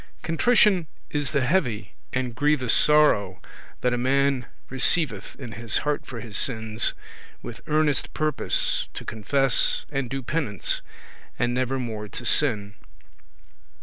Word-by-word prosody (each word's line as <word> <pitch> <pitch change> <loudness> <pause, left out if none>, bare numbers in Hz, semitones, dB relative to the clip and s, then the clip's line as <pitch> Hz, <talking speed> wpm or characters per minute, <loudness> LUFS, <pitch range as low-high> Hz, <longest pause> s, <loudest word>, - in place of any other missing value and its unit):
Contrition 190 0 +3 0.2
is 145 -2 -1
the 140 -4 0
heavy 120 - -1 0.2
and 125 -2 -2
grievous 145 -1 +2
sorrow 105 -12 +4 0.4
that 125 -1 +1
a 120 - -1
man 135 0 +1 0.2
receiveth 130 - +2
in 125 -4 -8
his 110 +1 -1
heart 150 -1 -2
for 120 -3 -7
his 105 -2 -7
sins, 110 -3 +1 0.5
with 120 - -8
earnest 150 -2 +1
purpose 155 0 0
to - - -7
confess 130 +4 +1
and 135 -4 -2
do 135 +1 -4
penance, 120 - -2 0.6
and 120 0 0
never 130 +1 -1
more 110 -4 -5
to 120 - -8
sin. 110 -6 +2
130 Hz, 130 wpm, -24 LUFS, 115-150 Hz, 0.6 s, sorrow